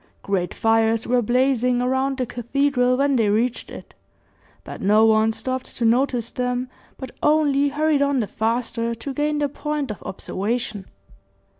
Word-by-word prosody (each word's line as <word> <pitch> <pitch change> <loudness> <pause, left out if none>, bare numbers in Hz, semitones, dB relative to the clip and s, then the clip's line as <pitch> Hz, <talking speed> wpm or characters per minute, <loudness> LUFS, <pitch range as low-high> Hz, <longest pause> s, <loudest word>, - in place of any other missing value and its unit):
Great 185 -3 -1
fires 225 0 +1
were 245 0 +2
blazing 250 +1 +1
around 265 +2 0
the 255 - -1
cathedral 250 +1 0
when 280 0 +2
they 220 -3 +2
reached 230 +4 0
it, - - -11 0.7
but - - -9
no 210 +3 +4
one 220 0 +4
stopped 255 +3 -5
to 235 - 0
notice 240 0 +1
them, 250 0 -2 0.3
but 260 -2 -8
only 290 -2 +3
hurried 300 0 +1
on 280 -1 +2
the 225 - 0
faster 230 +2 -2
to 270 +5 -6
gain 300 +1 0
their 295 -1 +1
point 295 -2 -3
of 210 - -8
observation. 205 +1 -4
250 Hz, 155 wpm, -22 LUFS, 225-275 Hz, 0.7 s, no